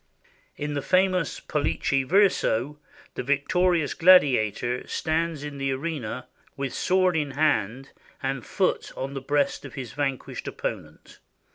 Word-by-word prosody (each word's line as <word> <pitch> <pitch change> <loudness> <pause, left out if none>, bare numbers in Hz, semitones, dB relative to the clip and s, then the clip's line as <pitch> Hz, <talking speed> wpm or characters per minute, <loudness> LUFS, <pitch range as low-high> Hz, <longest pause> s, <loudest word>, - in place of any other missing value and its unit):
In 150 0 -3
the 145 - -1
famous 185 0 +1
"Pollice 140 -2 0
Verso," 150 - +2 0.3
the - - -4
victorious 155 +4 +1
gladiator 125 - +4
stands 160 -1 -1
in 145 -1 -6
the 135 0 0
arena, 130 -4 -4 0.3
with 135 -2 -3
sword 185 -1 +2
in 150 -3 0
hand 135 -4 0 0.3
and 135 -2 -2
foot - - -1
on 135 +1 -4
the 135 - -5
breast 140 +1 0
of - - -10
his 125 -5 -6
vanquished 140 -3 -3
opponent. - - -6
145 Hz, 130 wpm, -25 LUFS, 135-165 Hz, 0.3 s, gladiator